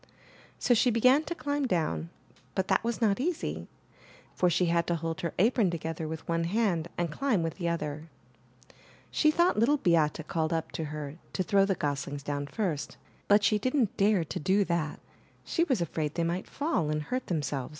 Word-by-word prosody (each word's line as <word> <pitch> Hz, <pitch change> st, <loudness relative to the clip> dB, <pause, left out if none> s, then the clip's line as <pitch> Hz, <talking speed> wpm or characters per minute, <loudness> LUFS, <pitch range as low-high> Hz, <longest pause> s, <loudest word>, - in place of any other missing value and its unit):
So 245 Hz, -, +3 dB
she 245 Hz, +2 st, +4 dB
began 255 Hz, +6 st, +4 dB
to 345 Hz, -, -4 dB
climb 285 Hz, -3 st, -1 dB
down, 85 Hz, -, -1 dB, 0.5 s
but 190 Hz, 0 st, -1 dB
that -, -, +3 dB
was 235 Hz, +1 st, -2 dB
not 205 Hz, -1 st, +3 dB
easy, 335 Hz, +5 st, -2 dB, 0.7 s
for 180 Hz, -, +2 dB
she 180 Hz, +2 st, +2 dB
had 170 Hz, 0 st, +1 dB
to 170 Hz, -, +1 dB
hold 165 Hz, 0 st, -3 dB
her 170 Hz, -, -3 dB
apron 220 Hz, 0 st, +3 dB
together 160 Hz, -1 st, -4 dB
with 160 Hz, 0 st, -6 dB
one 165 Hz, 0 st, 0 dB
hand 180 Hz, -4 st, +1 dB
and 175 Hz, -2 st, -1 dB
climb 225 Hz, -, 0 dB
with 165 Hz, -, -3 dB
the 170 Hz, -1 st, 0 dB
other. 155 Hz, -1 st, -4 dB, 1.0 s
She 305 Hz, -, +3 dB
thoug:ht 345 Hz, -1 st, +3 dB
Little 275 Hz, +7 st, +4 dB
Beate 160 Hz, -, +1 dB
called 160 Hz, -1 st, -1 dB
up 165 Hz, -1 st, -2 dB
to 160 Hz, -, -3 dB
her 150 Hz, 0 st, -6 dB, 0.2 s
to 185 Hz, -, 0 dB
throw 195 Hz, +2 st, +3 dB
the 195 Hz, -1 st, +1 dB
goslings 145 Hz, -2 st, -3 dB
down 145 Hz, 0 st, -3 dB
first, 160 Hz, -2 st, -3 dB, 0.3 s
but 205 Hz, +1 st, +5 dB
she 210 Hz, +1 st, +3 dB
didn't 255 Hz, -1 st, +1 dB
dare 200 Hz, -3 st, +3 dB
to 160 Hz, -, -5 dB
do 195 Hz, +5 st, +2 dB
that; 170 Hz, -4 st, -1 dB, 0.5 s
she 335 Hz, -, +1 dB
was 260 Hz, -, 0 dB
afraid 155 Hz, -2 st, -2 dB
they 170 Hz, -, 0 dB
might 170 Hz, +2 st, -2 dB
fall 280 Hz, -, -1 dB
and 150 Hz, 0 st, -1 dB
hurt 255 Hz, +10 st, -3 dB
themselves. 145 Hz, -6 st, -2 dB
170 Hz, 190 wpm, -29 LUFS, 155-225 Hz, 1.0 s, but